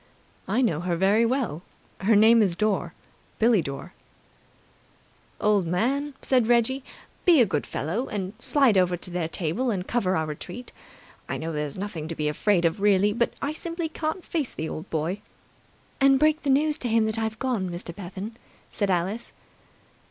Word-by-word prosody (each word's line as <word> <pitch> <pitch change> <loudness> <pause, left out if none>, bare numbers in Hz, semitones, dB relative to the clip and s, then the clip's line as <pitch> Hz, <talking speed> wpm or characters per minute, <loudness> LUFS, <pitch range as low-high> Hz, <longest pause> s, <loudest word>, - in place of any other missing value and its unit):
"I 225 +7 +2
know 165 -11 +1
her 175 0 -1
very 200 +6 +3
well. 235 - -1 0.4
Her 215 +3 +3
name's 215 -3 +5
Dore. 210 +1 0 0.4
Billie 225 -4 +4
Dore." 140 +5 -7 1.5
"Old 205 -4 +2
man," 270 - 0
said 250 -4 +2
Reggie, 245 +3 +2 0.4
"be 340 -5 +6
a 240 - +7
good 150 -7 -2
fellow 210 - -2
and 195 -2 -4
slide 245 -6 +3
over 180 -1 +2
to 180 +1 -9
their 175 -2 -1
table 175 +10 -1
and 190 -4 -2
cover 195 -6 +1
our 160 - 0
retreat. 180 +10 -7 0.6
I - - -2
know 165 +1 -4
there's 150 -1 -3
nothing 185 -6 -5
to 165 - -4
be 150 -1 -1
afraid 175 +4 +2
of 165 +4 0
really, 205 0 +4
but 235 +2 0
I 290 - -1
simply 335 +1 -4
can't 315 +3 -3
face 305 -7 -2
the 160 - -4
old 160 +4 -6
boy." 165 +6 -2 0.8
"And 270 -1 +5
break 305 +3 +3
the 285 - -2
news 295 +3 +2
to 245 - -3
him 225 0 +3
that 220 +1 -1
I've 220 -1 -2
gone, 235 -8 -1
Mr. 175 -1 -6
Bevan," 200 +4 -7 0.4
added 200 -2 +1
Alice. 190 +6 -1
210 Hz, 175 wpm, -26 LUFS, 175-245 Hz, 1.5 s, a